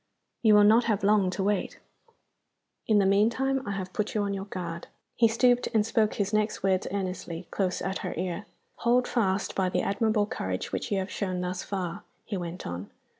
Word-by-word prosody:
"You 215 Hz, -3 st, +6 dB
will 210 Hz, -, +7 dB
not 225 Hz, +3 st, +6 dB
have 210 Hz, -3 st, 0 dB
long 200 Hz, -2 st, +4 dB
to 190 Hz, +1 st, -2 dB
wait. 205 Hz, -1 st, -1 dB, 1.1 s
In 215 Hz, -, +4 dB
the 200 Hz, -, +4 dB
meantime 235 Hz, +7 st, +2 dB
I 200 Hz, -, -1 dB
have 185 Hz, -1 st, -5 dB
put 215 Hz, +4 st, -2 dB
you 210 Hz, -, +2 dB
on 200 Hz, 0 st, -1 dB
your 195 Hz, 0 st, -4 dB
guard." 170 Hz, -4 st, -6 dB, 0.3 s
He 230 Hz, -, +5 dB
stooped, 245 Hz, +2 st, +3 dB
and 210 Hz, -1 st, +4 dB
spoke 220 Hz, -1 st, +1 dB
his 205 Hz, 0 st, -1 dB
next 215 Hz, -1 st, 0 dB
words 190 Hz, -1 st, +1 dB
earnestly, 185 Hz, -3 st, -4 dB
close 185 Hz, -2 st, -1 dB
at 190 Hz, +1 st, -2 dB
her -, -, -4 dB
ear. 185 Hz, +3 st, -3 dB, 0.3 s
"Hold 245 Hz, +2 st, +2 dB
fast 195 Hz, -5 st, 0 dB
by 190 Hz, -1 st, +1 dB
the -, -, 0 dB
admirable 215 Hz, 0 st, +1 dB
courage 95 Hz, -, -4 dB
which -, -, -3 dB
you 200 Hz, -, +2 dB
have 190 Hz, 0 st, -3 dB
shown 185 Hz, -3 st, -2 dB
thus 180 Hz, 0 st, -3 dB
far," 185 Hz, -4 st, -4 dB, 0.2 s
he 210 Hz, -, -4 dB
went 175 Hz, -1 st, -5 dB
on. 85 Hz, +3 st, -5 dB
200 Hz, 200 wpm, -28 LUFS, 185-215 Hz, 1.1 s, will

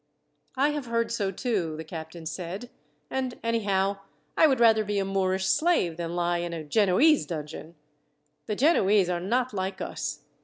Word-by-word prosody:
"I 280 Hz, +3 st, +3 dB
have 295 Hz, -4 st, -3 dB
heard 230 Hz, 0 st, 0 dB
so, 205 Hz, -4 st, 0 dB
too," 185 Hz, -6 st, -2 dB
the 160 Hz, -, -5 dB
captain 160 Hz, 0 st, -8 dB
said; 185 Hz, +9 st, -6 dB, 0.4 s
"and 260 Hz, -2 st, -2 dB
anyhow, 200 Hz, -4 st, 0 dB, 0.4 s
I 320 Hz, -, +6 dB
would 265 Hz, -4 st, +2 dB
rather 225 Hz, -2 st, +5 dB
be 205 Hz, 0 st, -2 dB
a 195 Hz, -, +1 dB
Moorish 190 Hz, -1 st, 0 dB
slave 190 Hz, -, +2 dB
than 170 Hz, 0 st, -4 dB
lie 175 Hz, 0 st, 0 dB
in 170 Hz, 0 st, -3 dB
a 165 Hz, -2 st, -5 dB
Genoese 215 Hz, -, +3 dB
dungeon. 155 Hz, 0 st, -7 dB, 0.7 s
The 210 Hz, -, -1 dB
Genoese 205 Hz, -, +3 dB
are 175 Hz, -1 st, 0 dB
not 240 Hz, +7 st, 0 dB
like 190 Hz, -1 st, -3 dB
us. -, -, -4 dB
195 Hz, 165 wpm, -27 LUFS, 175-230 Hz, 0.7 s, I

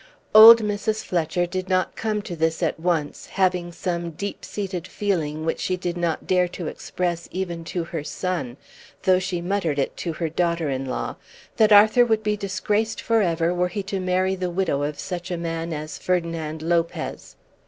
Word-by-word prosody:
Old 225 Hz, +1 st, +11 dB
Mrs. 210 Hz, +1 st, -1 dB
Fletcher 175 Hz, 0 st, 0 dB
did 185 Hz, +1 st, -4 dB
not 185 Hz, -1 st, +1 dB
come 215 Hz, -2 st, -2 dB
to 175 Hz, -, -6 dB
this 160 Hz, +1 st, 0 dB
at 160 Hz, -, 0 dB
once, 165 Hz, -3 st, -1 dB
having 180 Hz, -2 st, 0 dB
some 170 Hz, -1 st, -3 dB
deep 200 Hz, +6 st, -6 dB
seated 190 Hz, -4 st, -4 dB
feeling 160 Hz, -6 st, -2 dB
which 165 Hz, -, -1 dB
she 185 Hz, -, -1 dB
did 175 Hz, -1 st, -3 dB
not 170 Hz, -2 st, -2 dB
dare 180 Hz, -1 st, +3 dB
to 175 Hz, -1 st, -7 dB
express 170 Hz, +1 st, -3 dB
even 175 Hz, -2 st, -4 dB
to 170 Hz, +1 st, -3 dB
her 165 Hz, -2 st, -5 dB
son, 165 Hz, -7 st, -3 dB, 0.5 s
though 185 Hz, -1 st, +4 dB
she 180 Hz, -2 st, -3 dB
muttered 175 Hz, -5 st, -1 dB
it 140 Hz, -, -1 dB
to 170 Hz, -, -3 dB
her 165 Hz, +1 st, -2 dB
daughter 170 Hz, -2 st, 0 dB
in 135 Hz, 0 st, -2 dB
law, 130 Hz, -, -4 dB, 0.4 s
that 215 Hz, -1 st, +5 dB
Arthur 215 Hz, +4 st, +7 dB
would 220 Hz, -2 st, +1 dB
be 210 Hz, 0 st, +1 dB
disgraced 205 Hz, +2 st, -1 dB
for 230 Hz, -1 st, +2 dB
ever 170 Hz, -2 st, +1 dB
were 180 Hz, 0 st, +1 dB
he 195 Hz, +3 st, -4 dB
to 195 Hz, 0 st, -3 dB
marry 185 Hz, +1 st, +1 dB
the 185 Hz, -1 st, -2 dB
widow 175 Hz, -5 st, 0 dB
of 145 Hz, 0 st, -2 dB
such 175 Hz, -1 st, -5 dB
a 175 Hz, -, -2 dB
man 165 Hz, 0 st, -3 dB
as 155 Hz, 0 st, -5 dB
Ferdinand 165 Hz, -3 st, -2 dB
Lopez. 170 Hz, 0 st, -2 dB
180 Hz, 185 wpm, -23 LUFS, 165-190 Hz, 0.5 s, Old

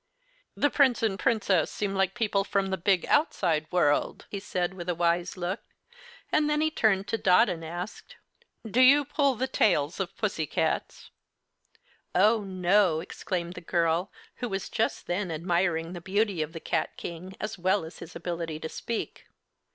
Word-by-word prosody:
"The 290 Hz, -, +2 dB
Prince 260 Hz, -5 st, +3 dB
and 200 Hz, -3 st, 0 dB
Princess 200 Hz, -7 st, +2 dB
seem 205 Hz, -2 st, -3 dB
like 195 Hz, -1 st, +1 dB
people 210 Hz, -4 st, +1 dB
from 195 Hz, -1 st, -1 dB
the -, -, +2 dB
big, 185 Hz, 0 st, +2 dB
outside 165 Hz, -, +1 dB
world," 150 Hz, -5 st, +1 dB
he 200 Hz, -, -3 dB
said, 185 Hz, -2 st, -2 dB
with 180 Hz, -1 st, -6 dB
a 175 Hz, -, 0 dB
wise 170 Hz, +2 st, 0 dB
look; 180 Hz, +5 st, -3 dB, 0.7 s
and 300 Hz, -1 st, +3 dB
then 300 Hz, 0 st, +1 dB
he 315 Hz, 0 st, +1 dB
turned 200 Hz, -8 st, +2 dB
to 225 Hz, -, -1 dB
Dot 185 Hz, +6 st, +5 dB
and 165 Hz, -2 st, -4 dB
asked: 175 Hz, +5 st, -7 dB, 0.5 s
"Do 230 Hz, +4 st, +2 dB
you 280 Hz, +3 st, +7 dB
pull 280 Hz, -1 st, +1 dB
the 255 Hz, -, -1 dB
tails 170 Hz, -, +1 dB
of 190 Hz, -1 st, -4 dB
pussycats?" 165 Hz, -9 st, -2 dB, 1.0 s
"Oh, 220 Hz, +1 st, +4 dB
no!" 185 Hz, -2 st, +2 dB
exclaimed 175 Hz, 0 st, -4 dB
the -, -, -9 dB
girl, 170 Hz, +2 st, 0 dB, 0.3 s
who 245 Hz, -, -3 dB
was 195 Hz, -1 st, -3 dB
just 225 Hz, -, -1 dB
then 180 Hz, +1 st, -2 dB
admiring 170 Hz, 0 st, 0 dB
the 175 Hz, -, -7 dB
beauty 195 Hz, -1 st, 0 dB
of 155 Hz, 0 st, -3 dB
the 165 Hz, -, -6 dB
cat -, -, -2 dB
King 180 Hz, +3 st, -7 dB
as 215 Hz, -2 st, -5 dB
well 185 Hz, 0 st, +1 dB
as 160 Hz, -, -11 dB
his 165 Hz, -, -10 dB
ability 170 Hz, -2 st, -4 dB
to 160 Hz, -, -4 dB
speak. 235 Hz, -, -5 dB
190 Hz, 170 wpm, -28 LUFS, 170-215 Hz, 1.0 s, you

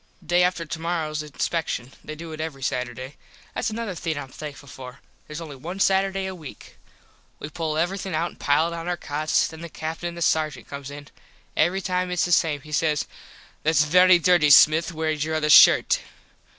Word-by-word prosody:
Day 175 Hz, 0 st, +3 dB
after 180 Hz, -2 st, +1 dB
tomorrows 160 Hz, -1 st, -3 dB
inspecshun. 150 Hz, -3 st, -3 dB
They 155 Hz, -, -7 dB
do 165 Hz, +1 st, -9 dB
it 155 Hz, 0 st, -6 dB
every 145 Hz, -4 st, -6 dB
Saturday. 125 Hz, +2 st, -4 dB, 0.4 s
Thats 235 Hz, -, -2 dB
another 220 Hz, -2 st, -4 dB
thing 165 Hz, -3 st, -4 dB
Im 135 Hz, -2 st, -6 dB
thankful 145 Hz, +1 st, -9 dB
for. 130 Hz, +1 st, -11 dB, 0.3 s
Theres 150 Hz, +1 st, -7 dB
only 155 Hz, -4 st, -8 dB
one 170 Hz, +8 st, -7 dB
Saturday 195 Hz, 0 st, +1 dB
a 190 Hz, -, -4 dB
weak. 155 Hz, -, -12 dB, 0.6 s
We 150 Hz, -, -8 dB
pull 155 Hz, -1 st, -3 dB
everything 185 Hz, +1 st, -2 dB
out 170 Hz, +2 st, -1 dB
an -, -, -19 dB
pile 155 Hz, +4 st, +1 dB
it -, -, -4 dB
on 165 Hz, 0 st, -6 dB
our 175 Hz, 0 st, -1 dB
cots. 155 Hz, 0 st, 0 dB
Then 160 Hz, 0 st, -11 dB
the 170 Hz, -, -7 dB
Captin 160 Hz, +2 st, -5 dB
an 170 Hz, -, -10 dB
the 170 Hz, -, -2 dB
Sargent 155 Hz, -4 st, 0 dB
comes 140 Hz, -1 st, -8 dB
in. 145 Hz, 0 st, -10 dB, 0.5 s
Every 190 Hz, +3 st, +1 dB
time 180 Hz, -1 st, -1 dB
its 180 Hz, -1 st, 0 dB
the 175 Hz, -, -3 dB
same. 155 Hz, -4 st, +2 dB
He 150 Hz, -, -13 dB
says 150 Hz, -1 st, 0 dB, 0.6 s
"Thats 155 Hz, -1 st, +3 dB
very 180 Hz, +4 st, +6 dB
dirty 175 Hz, -3 st, +3 dB
Smith 155 Hz, +3 st, +6 dB
wheres 155 Hz, -2 st, -2 dB
your 160 Hz, 0 st, -2 dB
other 150 Hz, -1 st, +1 dB
shirt." -, -, +7 dB
160 Hz, 195 wpm, -24 LUFS, 150-175 Hz, 0.6 s, shirt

